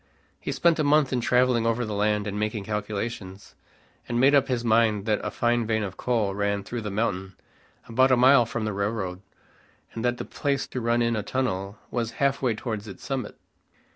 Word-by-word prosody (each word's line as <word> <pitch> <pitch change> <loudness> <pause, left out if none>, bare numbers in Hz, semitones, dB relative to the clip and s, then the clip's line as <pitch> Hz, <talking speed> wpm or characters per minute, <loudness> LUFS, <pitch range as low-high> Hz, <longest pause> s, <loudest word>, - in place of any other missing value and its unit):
He - - -4
spent 170 -1 +2
a - - +3
month 145 -2 +3
in 125 - +1
traveling 125 -1 +3
over 115 +1 0
the 110 - -4
land 105 0 +1
and 105 0 -3
making 105 -1 -2
calculations; 105 -2 -5 0.6
and 120 0 0
made 135 +3 +5
up 140 -2 +4
his 120 -2 -1
mind 110 -3 +3
that 110 -2 0
a - - -1
fine 120 -1 0
vein 110 -1 +1
of 95 -2 -5
coal 110 -6 0
ran 100 0 -1
through 120 +3 -5
the 105 - -4
mountain 95 -3 -2 0.5
about 130 +3 +3
a 130 - +4
mile 125 -1 +6
from 115 -1 -3
the 105 - -2
railroad, 100 -2 -2 0.7
and 115 - -5
that 120 0 +1
the - - -5
place 140 -2 -1
to 125 - -4
run 120 +1 +2
in 115 0 +1
a 110 - -1
tunnel 100 -4 -2
was 115 -2 -2
half 140 0 0
way 125 -4 +1
towards 110 -2 -5
its 100 - -10
summit. 130 -5 -4
115 Hz, 205 wpm, -26 LUFS, 105-125 Hz, 0.7 s, mile